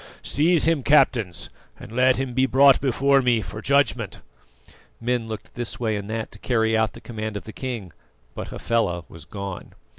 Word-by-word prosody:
Seize 165 +3 +3
him, 165 -3 +2
captains, 120 -9 +2 0.3
and - - -11
let 130 +2 +3
him 130 -1 -3
be 130 +1 +2
brought 135 +1 +5
before 135 +1 +3
me 120 -3 +2
for 110 0 -7
judgment!" 140 -7 +1 0.8
Men 120 -1 -1
looked 110 -2 -8
this 120 -1 -5
way 110 -3 0
and 100 0 -5
that 110 0 -4
to 105 - -13
carry 110 -2 +1
out 110 -1 +1
the - - -11
command 110 -2 -5
of - - -8
the 110 - -10
king, 115 - -5 0.4
but - - -6
Hafela 100 -8 -1
was 80 -2 -12
gone. 100 +3 -7
115 Hz, 180 wpm, -23 LUFS, 110-130 Hz, 0.8 s, brought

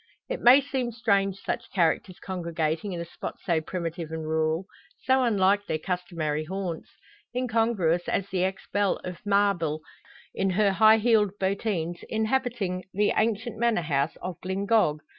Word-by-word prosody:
It - - -3
may 255 +4 +8
seem 260 -3 -2
strange 200 -4 +1
such - - -4
characters 175 0 +1
congregating 170 0 -2
in 175 - -4
a 170 - -4
spot 170 - -7
so 170 -4 +2
primitive 170 -1 -4
and 160 0 -4
rural, 160 +2 0 0.4
so 260 0 +3
unlike 205 -3 +2
their 155 - 0
customary 165 -3 -2
haunts; 185 -1 -4 0.5
incongruous 225 -9 +1
as 195 - 0
the 185 -1 0
ex 190 +1 -2
belle 205 -1 +2
of 180 -1 -7
Mabille 195 -7 +2 0.5
in 195 - 0
her 200 +2 +3
high 220 +3 +6
heeled 215 -3 +2
bottines 190 -3 -1
inhabiting 220 -5 -1
the 205 +2 +2
ancient 220 0 0
manor 235 -5 +2
house 145 -1 0
of 180 -2 -5
Glyngog. 190 -4 +1
190 Hz, 150 wpm, -27 LUFS, 170-220 Hz, 0.5 s, may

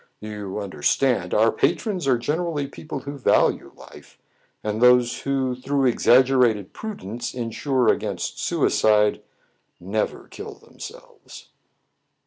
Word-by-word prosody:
You 105 -2 -6
under 100 -7 -7
stand, 130 - +1
our 110 +1 +4
patrons 190 - -1
are 130 -2 +4
generally 150 +4 -2
people 140 0 -7
who 140 +1 -7
value - - +2
life; - - -15 0.5
and 110 +1 -2
those 125 -1 +5
who, 135 -2 -1
through 135 +2 -1
exaggerated 125 -4 +3
pru 215 -1 -6
dence, 115 +6 -6
insure 125 +1 -1
against - - -1
suicide, 105 -1 +2 0.6
never 100 +5 -3
kill - - -9
them - - -22
selves." - - -12
125 Hz, 120 wpm, -23 LUFS, 110-140 Hz, 0.6 s, those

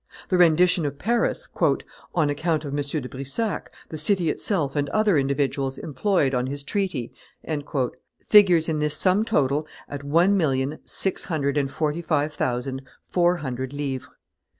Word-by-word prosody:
The 185 - +2
rendition 175 +1 +4
of 140 0 -5
Paris, 235 +8 0 0.7
"on 155 -4 +2
account 155 +1 -1
of 140 - -5
M. 145 - 0 0.2
de 125 - -6
Brissac, 140 - -3 0.2
the 155 - -4
city 175 0 +3
itself 155 -9 -1
and 145 -1 0
other 215 -1 +2
individuals 135 -1 0
employed 155 -1 0
on 125 0 0
his 140 +1 -4
treaty," 160 - -2 1.1
figures 180 -6 +6
in 155 -2 -1
this 150 0 0
sum 190 +3 +3
total 150 -8 +1 0.2
at 140 0 -7
one 170 +8 +3
million, 140 -4 0
six 190 - -1
hundred 145 -5 -1
and 140 -2 +1
forty 155 +3 -1
five 150 -2 0
thousand, 130 0 -2 0.2
four 175 0 +2
hundred 130 +1 -4
livres. 140 -3 -3
150 Hz, 150 wpm, -24 LUFS, 140-175 Hz, 1.1 s, figures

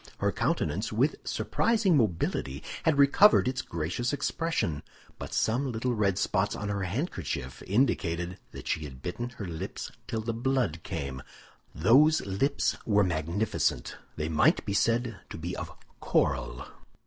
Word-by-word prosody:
Her - - +1
countenance, - - -1
with - - +2
surprising 215 -6 +1
mobility, 85 - 0 0.2
had 160 -3 +3
recovered 140 +6 +6
its 130 0 -1
gracious 90 - -2
expression; 145 - -1 0.4
but - - -6
some 125 +4 +1
little 120 +2 -1
red 100 -4 +1
spots 100 0 +1
on 105 - -4
her 100 -1 -1
handkerchief 90 - -3
indicated 90 -6 0
that - - -9
she 80 - -1
had 65 -2 -10
bitten 120 +7 -3
her 105 - -4
lips 80 -3 -5 0.2
till 110 - -2
the 115 +1 -2
blood 120 - 0
came. 70 -4 -5 0.5
Those 140 - +5
lips 100 +9 0
were 105 -2 +3
magnificent; 85 +4 -1 0.2
they 75 0 -2
might 80 -1 +3
be 100 - -2
said 115 0 +1
to - - -7
be 85 +3 -4
of - - -5 0.3
coral. - - 0
105 Hz, 145 wpm, -29 LUFS, 85-130 Hz, 0.5 s, recovered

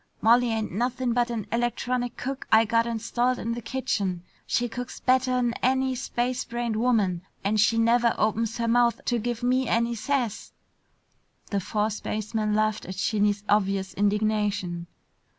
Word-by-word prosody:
Molly 240 +2 +5
ain't 220 -1 -2
nothing 245 +3 -1
but 240 0 +1
an 230 -3 -3
electronic 240 +1 -1
cook 270 +1 -5
I 220 +1 +6
got 230 +1 +2
installed 240 +2 0
in 230 -1 -3
the 240 - -5
kitchen. 210 -7 -2 0.2
She 245 - +1
cooks 245 +1 -6
better'n 255 -2 +2
any 260 +1 +2
space 250 0 -2
brained 235 -1 -3
woman 215 -7 +1 0.2
and 210 +2 +1
she 220 +2 +4
never 235 +1 +3
opens 220 +1 0
her 230 -1 -1
mouth 240 0 +3
to 240 -1 +1
give 240 +1 -3
me 255 +1 +2
any 235 +1 +1
sass!" 240 -2 -2 1.0
The 200 - +1
four 210 +3 -1
spacemen 215 0 -2
laughed 215 0 0
at 185 - -6
Shinny's 205 +1 +1
obvious 195 -2 +1
indignation. 205 -4 0
230 Hz, 150 wpm, -26 LUFS, 210-245 Hz, 1.0 s, I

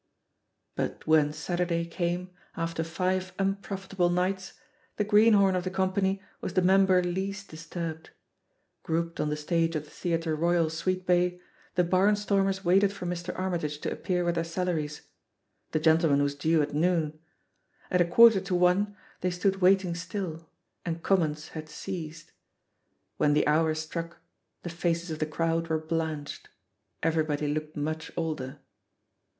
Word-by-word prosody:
'* - - -52
But - - -3
when 155 -2 +4
Saturday 175 +1 -1
came, 175 +1 -2 0.3
after 165 -1 -2
five 185 +3 -1
unprofit 195 0 -3
able 175 -2 +3
nights, 185 +1 -1 0.4
the 210 - +2
greenhorn 205 -2 +5
of 180 - 0
the 185 - -2
company 190 +1 0 0.2
was 185 - -5
the 185 - +3
member 190 0 +5
least 195 +3 -3
disturbed. 160 0 -6 0.7
Grouped 165 +1 -2
on 150 - 0
the 150 - -1
stage 165 +2 0
of 150 - -1
the 150 - -17
Theatre 165 -2 -1
Royal, 170 0 +2
Sweetbay, 180 +1 +1 0.4
the 180 - +4
barn 185 +4 +3
stormers 195 -2 0
waited 195 +3 +4
for 195 -3 -7
Mr. 175 0 -4
Armytage 170 -5 -2
to - - -2
appear 180 -1 -1
with 175 - +2
their 165 -1 0
salaries. 165 -3 -2 0.7
The 155 - +1
gentleman 160 -2 +4
was 140 0 0
due 155 +2 +2
at 145 - -4
noon. 155 -1 +1 0.7
At 180 - +3
a - - +5
quarter 220 +3 +7
to 185 -1 -2
one 185 +3 +2 0.2
they 180 - 0
stood 190 +2 0
waiting 190 -1 +3
still, 170 -2 -5 0.3
and 165 -1 -4
comments 155 -6 +1
had 155 -1 -8
ceased. 160 -1 -7 0.9
When 145 - +3
the 150 - +3
hour 155 +1 +3
struck, 165 +2 -5 0.5
the 175 - -4
faces 170 0 -1
of 155 - -4
the 155 - 0
crowd 165 +1 0
were 160 -1 +1
blanched; 155 -2 -4 0.5
everybody 155 -2 +1
looked 155 0 -4
much 155 +2 -3
older. 150 -4 -3
170 Hz, 155 wpm, -28 LUFS, 160-185 Hz, 0.9 s, quarter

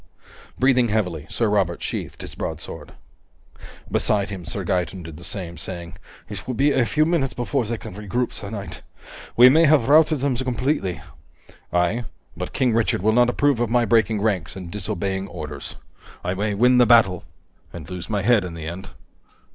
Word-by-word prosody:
Breathing 130 -2 +3
heavily, 90 -8 -1
Sir 115 - 0
Robert 95 -5 0
sheathed - - -4
his - - -7
broadsword. - - -6 1.0
Beside 105 -1 +1
him, 95 -3 -6
Sir 95 +3 -4
Gaeton 90 +1 -1
did 80 -2 -9
the 85 - -12
same, 85 -3 -5
saying: 85 -3 -7 0.3
"It 100 -2 -7
will 130 - -2
be 140 +4 +3
a 130 -4 +2
few 155 +5 +2
minutes 155 -6 0
before 125 +1 -1
they 115 +2 -2
can - - -9
regroup, 105 +5 -2
sir 100 - -5
knight. 100 -2 -7 0.6
We 125 +1 +10
may 160 +6 +6
have 145 -5 +4
routed 155 -1 +5
them 140 -2 +1
completely." 125 - -1 0.7
"Aye. 90 +7 +1 0.3
But - - -5
King 125 -3 +1
Richard 110 -5 +1
will 110 +1 +3
not 120 +1 +4
approve 140 0 +2
of 120 -2 0
my 120 0 +3
breaking 110 -1 +2
ranks 100 -7 -1
and 90 -3 -8
disobeying 100 -1 -3
orders. - - -7 0.5
I 90 - -1
may 100 +2 -1
win 125 +4 +4
the 120 - +6
battle 110 -6 +5 0.5
and 80 -3 -9
lose 90 +2 -7
my 105 -3 -1
head 115 -2 +4
in 90 -2 -6
the 80 -1 -7
end." 90 +4 -6
105 Hz, 180 wpm, -23 LUFS, 90-125 Hz, 1.0 s, We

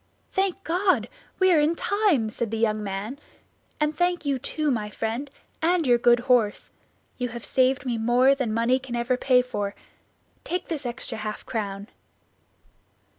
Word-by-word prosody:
"Thank 385 0 0
God! 370 +3 +1 0.3
we 375 -1 +4
are 320 - +5
in 305 +3 +2
time," 380 - +1
said 235 0 -3
the 225 - -3
young 215 -1 +1
man, 205 +7 -4 0.6
"and 300 0 +1
thank 350 -1 0
you, 275 -2 0
too, 300 +3 -1
my 215 -4 -2
friend, 230 +6 -3 0.3
and 340 0 +2
your 240 -2 +4
good 240 0 +4
horse. 240 -5 +1 0.5
You 250 -1 -1
have 235 0 -7
saved 260 0 +2
me 240 -3 -1
more 245 +4 +4
than 260 -5 -2
money 235 +4 +2
can 255 -2 -6
ever 240 +2 +1
pay 250 0 +3
for. 205 -5 -4 0.7
Take 360 +1 -3
this 300 -6 -3
extra 240 -2 -5
half 215 0 -5
crown." 200 -2 -4
250 Hz, 165 wpm, -25 LUFS, 225-300 Hz, 0.7 s, are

